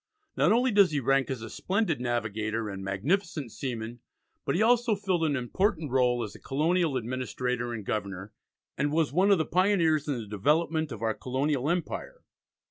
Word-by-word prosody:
Not -, -, +3 dB
only 245 Hz, +2 st, +3 dB
does 200 Hz, -3 st, +6 dB
he 150 Hz, -2 st, 0 dB
rank 135 Hz, +1 st, +2 dB
as 130 Hz, -4 st, -4 dB
a 110 Hz, -, -7 dB
splendid 190 Hz, -, -1 dB
navigator 110 Hz, -2 st, -2 dB
and 95 Hz, 0 st, -6 dB
magnificent 140 Hz, -, -1 dB
seaman, 120 Hz, -2 st, -5 dB, 0.5 s
but -, -, 0 dB
he 185 Hz, -, +1 dB
also 240 Hz, -1 st, +3 dB
filled 190 Hz, -4 st, -1 dB
an 145 Hz, -2 st, +1 dB
important 155 Hz, -, -1 dB
rôle 125 Hz, -2 st, +2 dB
as 105 Hz, -, -9 dB
a -, -, -13 dB
colonial 155 Hz, +1 st, +1 dB
administrator 125 Hz, 0 st, -3 dB
and 110 Hz, -4 st, -5 dB
governor, 100 Hz, -1 st, -4 dB, 0.4 s
and 145 Hz, +1 st, 0 dB
was 155 Hz, -2 st, +1 dB
one 190 Hz, +5 st, +3 dB
of 200 Hz, -, +6 dB
the 160 Hz, -, 0 dB
pioneers 170 Hz, -5 st, +2 dB
in 140 Hz, -4 st, -1 dB
the 115 Hz, -, -5 dB
development 155 Hz, -, 0 dB
of 115 Hz, -, -6 dB
our 110 Hz, -1 st, +1 dB
colonial 135 Hz, +3 st, -1 dB
empire. 180 Hz, -, -3 dB
140 Hz, 180 wpm, -28 LUFS, 120-175 Hz, 0.5 s, does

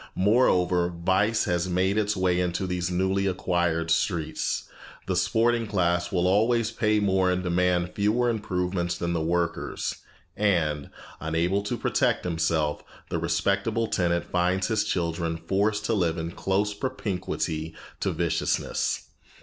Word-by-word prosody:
Moreover, 90 Hz, -4 st, +3 dB
vice 95 Hz, +6 st, +2 dB
has 90 Hz, +1 st, 0 dB
made 95 Hz, +2 st, +1 dB
its 105 Hz, -1 st, 0 dB
way 90 Hz, -1 st, +2 dB
into 90 Hz, +1 st, -1 dB
these 90 Hz, -1 st, -2 dB
newly 95 Hz, +2 st, +1 dB
acquired 85 Hz, -3 st, 0 dB
streets. 80 Hz, -2 st, 0 dB, 0.4 s
The -, -, -1 dB
sporting 115 Hz, 0 st, +2 dB
class 90 Hz, -3 st, 0 dB
will 90 Hz, -1 st, +1 dB
always 110 Hz, +4 st, +2 dB
pay 105 Hz, -1 st, +1 dB
more 95 Hz, -2 st, +2 dB
and 90 Hz, 0 st, 0 dB
demand 90 Hz, 0 st, +1 dB
fewer 110 Hz, +4 st, +1 dB
improvements 90 Hz, -5 st, -1 dB
than 85 Hz, 0 st, -2 dB
the 85 Hz, -, 0 dB
workers, 85 Hz, +1 st, -1 dB, 0.4 s
and, 80 Hz, -8 st, +1 dB, 0.3 s
unable 85 Hz, +5 st, 0 dB
to 100 Hz, -, -3 dB
protect -, -, +1 dB
himself, 80 Hz, -3 st, 0 dB, 0.3 s
the -, -, 0 dB
respectable 115 Hz, +3 st, 0 dB
tenant 85 Hz, -5 st, 0 dB
finds 90 Hz, +2 st, 0 dB
his 110 Hz, -2 st, +2 dB
children 85 Hz, -3 st, -1 dB
forced 100 Hz, +5 st, 0 dB
to 115 Hz, -, +1 dB
live 85 Hz, -5 st, +1 dB
in 80 Hz, +1 st, -3 dB
close 100 Hz, +3 st, 0 dB
propinquity 95 Hz, -, -3 dB, 0.2 s
to -, -, 0 dB
viciousness. -, -, -1 dB
90 Hz, 135 wpm, -26 LUFS, 85-100 Hz, 0.4 s, Moreover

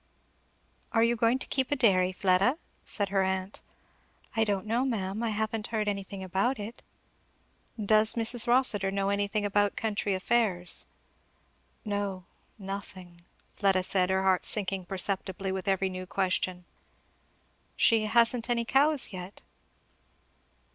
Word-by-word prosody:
"Are 225 Hz, -, +3 dB
you 235 Hz, +1 st, +2 dB
going 230 Hz, +2 st, +2 dB
to -, -, 0 dB
keep 265 Hz, -2 st, -1 dB
a 290 Hz, -, +1 dB
dairy, 190 Hz, -8 st, +3 dB
Fleda?" 190 Hz, -, +2 dB, 0.3 s
said 205 Hz, -2 st, -1 dB
her 195 Hz, 0 st, +1 dB
aunt. 190 Hz, +1 st, -3 dB, 0.7 s
"I 225 Hz, -, +3 dB
don't 200 Hz, -3 st, -2 dB
know, 230 Hz, +4 st, 0 dB
ma'am; 210 Hz, -5 st, -2 dB
I 230 Hz, -, 0 dB
haven't 220 Hz, 0 st, -3 dB
heard 215 Hz, -2 st, -2 dB
anything 195 Hz, -1 st, -4 dB
about 195 Hz, +7 st, -1 dB
it." 215 Hz, +3 st, -8 dB, 1.0 s
"Does 215 Hz, +1 st, +3 dB
Mrs. 230 Hz, 0 st, +3 dB
Rossitur 235 Hz, -6 st, +3 dB
know 195 Hz, 0 st, -1 dB
anything 205 Hz, +1 st, -1 dB
about 205 Hz, 0 st, +1 dB
country 205 Hz, -2 st, -1 dB
affairs?" 185 Hz, -3 st, +1 dB, 1.0 s
"No 200 Hz, -3 st, -3 dB, 0.3 s
nothing," 190 Hz, -3 st, -8 dB, 0.4 s
Fleda 195 Hz, -2 st, +2 dB
said, 185 Hz, 0 st, +1 dB
her 190 Hz, 0 st, +1 dB
heart 190 Hz, -1 st, +2 dB
sinking 195 Hz, -3 st, -1 dB
perceptibly 190 Hz, +1 st, -1 dB
with 190 Hz, 0 st, -5 dB
every 195 Hz, 0 st, +1 dB
new 185 Hz, 0 st, -6 dB
question. 185 Hz, -1 st, -1 dB, 1.1 s
"She 225 Hz, -2 st, +3 dB
hasn't 235 Hz, +1 st, +3 dB
any 235 Hz, -1 st, 0 dB
cows 275 Hz, -1 st, +2 dB
yet?" 185 Hz, +1 st, -9 dB
200 Hz, 135 wpm, -28 LUFS, 190-225 Hz, 1.1 s, Are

